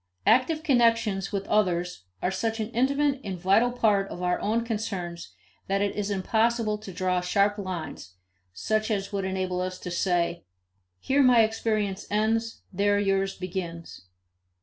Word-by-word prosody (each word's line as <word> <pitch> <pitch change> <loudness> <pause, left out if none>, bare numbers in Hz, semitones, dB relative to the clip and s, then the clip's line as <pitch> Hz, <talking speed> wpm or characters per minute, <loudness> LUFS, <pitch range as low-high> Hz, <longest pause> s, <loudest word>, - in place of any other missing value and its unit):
Active 310 +5 +3
connections 230 -8 +2
with 200 -1 -2
others 180 - 0 0.2
are 180 - +1
such 225 +4 -2
an 220 +1 -3
intimate 275 +3 +1
and 190 -3 -4
vital 200 +7 +3
part 210 -5 +2
of 180 - -6
our 180 0 +1
own 230 +3 0
concerns 185 - -4 0.3
that 195 +1 +1
it 200 - -1
is 205 -1 -2
impossible 220 +2 +1
to 210 -2 -9
draw 180 0 0
sharp 200 +3 +1
lines, 175 - -6 0.4
such 215 - -1
as 200 -1 -2
would 195 -1 -1
enable 185 -1 -2
us 185 0 -3
to 180 - -7
say, 175 -1 0 0.6
"Here 275 - +2
my 250 -4 +6
experience 215 -3 -1
ends; 225 +2 0
there 205 +2 +2
yours 195 -1 0
begins." 170 - -6
200 Hz, 150 wpm, -26 LUFS, 185-225 Hz, 0.6 s, my